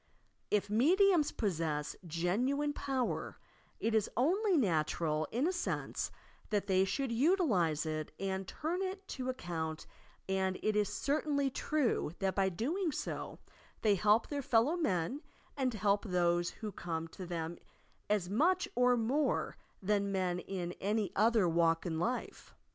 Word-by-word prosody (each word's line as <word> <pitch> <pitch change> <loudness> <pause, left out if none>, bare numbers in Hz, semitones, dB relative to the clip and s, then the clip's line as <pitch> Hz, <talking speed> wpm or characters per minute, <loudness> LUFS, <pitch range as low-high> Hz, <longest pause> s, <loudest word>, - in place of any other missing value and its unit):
If 210 -1 +1
mediums 325 - +4
possess 160 -7 -1
genuine 245 - 0
power, 265 -4 -2 0.4
it 225 - 0
is 220 -2 +2
only 370 - +3
natural, 155 - +1
in 250 +6 +1
a - - +2
sense, 355 - -2 0.4
that 205 -2 0
they 190 -1 +3
should 270 +5 -1
utilize 230 - +2
it 155 -1 -3
and 190 -1 -2
turn 335 - -3
it 385 0 -4
to 255 -1 -3
account, 165 -9 -4 0.4
and 190 -1 0
it 215 -1 +1
is 210 -2 +2
certainly 285 -1 0
true 260 - 0
that 195 -1 0
by 195 -1 +2
doing 310 - -1
so - - -4 0.5
they 215 -2 +5
help 210 +4 +3
their 285 -1 -2
fellow 250 +5 +3
men 245 - -1 0.3
and 265 -3 0
help 205 -1 +2
those 175 -2 +2
who 215 -2 -6
come 165 -3 -4
to 185 +2 -8
them 170 -1 -4 0.5
as 205 -4 +1
much 345 - +2
or 250 0 +4
more 260 +6 0 0.3
than 200 0 +1
men 185 -2 0
in 180 -2 -4
any 210 +1 0
other 220 -2 +4
walk 165 0 +2
in 160 -2 -2
life. 240 +9 -3
210 Hz, 145 wpm, -33 LUFS, 175-275 Hz, 0.5 s, they